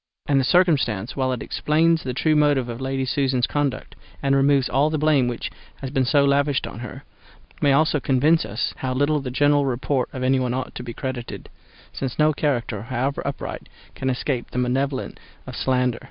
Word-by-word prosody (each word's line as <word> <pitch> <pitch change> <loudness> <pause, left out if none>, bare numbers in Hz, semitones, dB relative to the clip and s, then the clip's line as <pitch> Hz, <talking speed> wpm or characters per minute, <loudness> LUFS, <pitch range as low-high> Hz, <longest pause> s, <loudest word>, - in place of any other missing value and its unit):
And 140 -1 +3
this 130 - +1
circumstance, 135 - +2
while 130 -1 0
it 125 - -3
explains 160 +2 +2
the 125 -1 -4
true 155 +3 +2
motives 145 -4 +2
of 120 +2 -6
Lady 135 0 -1
Susan's 130 -2 +1
conduct, 145 -3 -2 0.3
and 140 0 +3
removes 135 -1 +3
all 145 +3 +2
the 155 - -1
blame 150 -4 +3
which 120 -1 -4 0.2
has 135 -2 -7
been 135 -2 +1
so 140 +2 +3
lavished 140 -1 +2
on - - -8
her, - - -8 0.6
may 140 - +4
also 150 +2 +3
convince 145 +5 +3
us 110 +2 -3
how 130 -1 -3
little 145 +3 +2
the 135 -2 -5
general 145 +2 +3
report 130 +1 -1
of 130 -2 -5
anyone 130 -1 +1
ought 130 0 -4
to - - -6
be 120 -1 -6
credited; 130 -3 -6 0.4
since 130 -3 -4
no 155 0 +4
character, 120 -8 -1
however 130 +4 -2
upright, 140 - -5 0.2
can 130 - -2
escape 125 -1 -2
the - - -7
malevolence 130 +2 -1 0.3
of - - -8
slander. 125 -2 0
135 Hz, 190 wpm, -23 LUFS, 125-145 Hz, 0.6 s, may